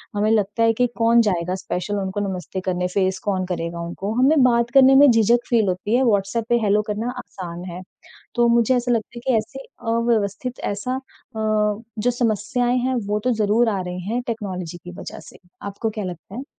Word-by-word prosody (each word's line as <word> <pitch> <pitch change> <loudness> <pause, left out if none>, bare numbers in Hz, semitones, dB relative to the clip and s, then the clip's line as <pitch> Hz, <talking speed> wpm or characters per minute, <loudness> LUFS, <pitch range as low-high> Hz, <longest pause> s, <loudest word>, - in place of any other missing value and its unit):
हमें 210 +1 +1
लगता 210 +1 +1
है 225 0 +4
कि 245 +2 +2
कौन 230 0 +5
जाएगा 180 0 -1
स्पेशल 190 +2 -3
उनको 190 +1 -3
नमस्ते 185 0 -5
करने, 180 -1 0
फ़ेस 190 0 0
कौन 190 -2 0
करेगा 170 -1 -4
उनको। 190 +5 -4
हमें 280 0 +5
बात 235 -1 +3
करने 270 0 +7
में 285 0 +8
झिझक 235 +2 +3
फील 225 -5 +3
होती 190 +5 0
है। 260 - +3
व्हाट्सएप 215 0 +1
पे 240 0 +3
हेलो 210 0 +3
करना 225 +4 -2
आसान 175 -7 -7
है। 180 +2 -7 0.5
तो 240 0 +4
मुझे 235 +2 +3
ऐसा 245 0 0
लगता 230 +1 -2
है - - -7
कि 260 - +3
ऐसी 220 +5 -4 0.3
अव्यवस्थित 230 +1 0
ऐसा 250 +6 -3
अ, 260 -3 -11 0.6
जो 245 +3 +2
समस्याएँ 240 +1 0
हैं 255 +1 0
वो 210 +1 0
तो 255 - +3
ज़रूर 220 +2 +3
आ 200 -3 -1
रही 180 0 -5
हैं 245 +2 0
टेक्नोलॉजी 185 -7 -4
की 175 - -8
वजह - - -8
से। - - -16 0.3
आपको 200 +3 -3
क्या 210 -1 -5
लगता 180 +3 -8
है? 260 - -5
215 Hz, 200 wpm, -22 LUFS, 190-240 Hz, 0.6 s, में